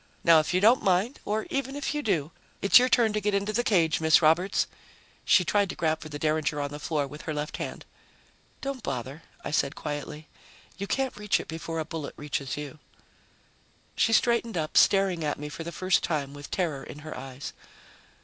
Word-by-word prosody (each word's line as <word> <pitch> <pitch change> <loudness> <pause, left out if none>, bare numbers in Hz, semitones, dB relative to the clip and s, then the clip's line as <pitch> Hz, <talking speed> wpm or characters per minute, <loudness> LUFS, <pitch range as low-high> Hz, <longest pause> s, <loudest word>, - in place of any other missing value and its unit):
Now 165 -1 +7
if 155 - -1
you 180 - +2
don't 225 +6 +5
mind 195 +7 +1
or 215 +1 -1
even 275 0 -2
if 290 0 -2
you 295 - -1
do 165 - 0 0.3
it's 200 - +7
your 255 +1 +2
turn 230 -4 +3
to 210 - -1
get 205 0 +1
into 200 +2 -1
the 240 +3 +1
cage, 170 -10 +2
Miss 160 0 +6
Roberts." 170 +5 +3 0.6
She 180 - +5
tried 200 +2 +2
to - - -4
grab 160 -2 0
for 155 - -8
the 145 - -5
derringer 155 -1 0
on 145 0 -3
the 145 - -7
floor 150 -1 -1
with 150 +2 -9
her 155 - -2
left 150 +3 -4
hand. - - -6 0.8
"Don't 275 -2 -4
bother," 135 - -5 0.2
I - - -3
said 140 -1 +1
quietly. 150 +1 -6 0.5
"You 200 +1 -5
can't 265 +2 -1
reach 210 -2 +1
it - - -7
before 165 0 -5
a 160 - -2
bullet 155 -2 -6
reaches 145 -3 -3
you." 150 +1 -7 1.2
She 225 - +2
straightened 235 -2 +2
up, 155 -1 -3
staring 195 -4 +4
at 150 - -1
me 150 +1 -6
for 165 - -7
the 170 - -6
first 185 +3 +1
time 145 -4 -2
with 145 0 -9
terror 155 -7 -2
in 145 - -9
her 155 - -6
eyes. 135 +1 -7
165 Hz, 205 wpm, -27 LUFS, 150-205 Hz, 1.2 s, Now